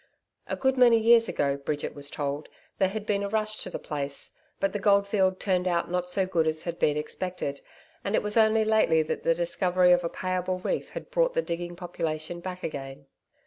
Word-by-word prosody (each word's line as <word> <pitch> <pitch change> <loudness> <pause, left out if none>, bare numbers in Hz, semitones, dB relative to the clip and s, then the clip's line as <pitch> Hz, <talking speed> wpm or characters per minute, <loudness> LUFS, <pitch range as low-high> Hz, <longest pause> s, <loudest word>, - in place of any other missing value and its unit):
A - - -2
good 265 0 +1
many 240 -2 +7
years 230 0 +5
ago, 140 -1 0
Bridget 145 +1 -3
was 145 0 -4
told, 145 +1 -4 0.3
there 190 -2 +3
had 210 +1 -5
been 200 -2 0
a 200 - -2
rush 215 0 0
to - - -4
the - - -4
place, 140 -2 -4 0.2
but 195 - 0
the 205 - -2
gold 200 0 +4
field 190 -2 +1
turned 185 -2 0
out 170 -1 0
not 180 0 -1
so 190 +1 +1
good 170 -4 +1
as 155 0 0
had 170 -1 -5
been 150 0 +2
expected, 150 -2 -4 0.4
and 200 - 0
it - - +1
was 210 0 0
only 220 -1 +4
lately 215 -7 +3
that 155 - -3
the 165 - +2
discovery 180 +1 +2
of 175 0 +4
a 170 - -1
payable 185 0 -2
reef 185 - -3
had - - -8
brought - - +2
the - - +1
digging 175 +1 -4
population 170 -2 -4
back 185 +1 -7
again. 135 -2 -6
180 Hz, 215 wpm, -27 LUFS, 160-205 Hz, 0.4 s, many